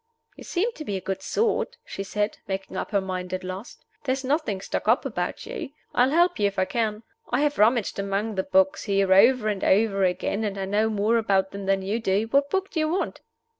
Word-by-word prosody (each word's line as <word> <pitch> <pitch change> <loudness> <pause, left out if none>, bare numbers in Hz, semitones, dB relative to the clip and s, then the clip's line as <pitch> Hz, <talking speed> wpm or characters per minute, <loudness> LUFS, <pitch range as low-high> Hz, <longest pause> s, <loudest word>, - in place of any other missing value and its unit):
"You - - -11
seem 400 +7 0
to 320 - -8
be 205 -9 -3
a - - -3
good 190 +1 -4
sort," 460 - 0
she - - -6
said, 205 +2 -2
making 190 0 -4
up - - -3
her 200 -2 +1
mind 185 -1 -4
at 185 - -6
last. 185 +4 -8 0.2
"There's 265 -1 -1
nothing 265 - 0
stuck 195 - -4
up 230 +5 +3
about 180 -9 -3
you. - - -5 0.2
I'll 250 +2 +4
help 345 +1 +3
you 205 - +4
if 200 - -5
I 185 - +3
can. 220 0 -2 0.3
I - - +1
have 295 0 0
rummaged 220 -1 +3
among 200 +2 -1
the 190 - 0
books 190 0 +2
here 195 -2 +3
over 230 +3 +5
and 205 -3 -1
over 195 -1 +3
again, 185 +4 0
and 200 -2 -2
I 195 - -2
know 210 +3 +1
more 215 +2 +2
about 195 -4 +1
them 200 -1 -6
than 195 0 +2
you 205 +4 -1
do. 200 -1 +1
What 280 +1 +3
book 385 +4 -1
do 330 - -2
you 310 0 +1
want?" 360 +4 -2
205 Hz, 230 wpm, -25 LUFS, 195-250 Hz, 0.3 s, over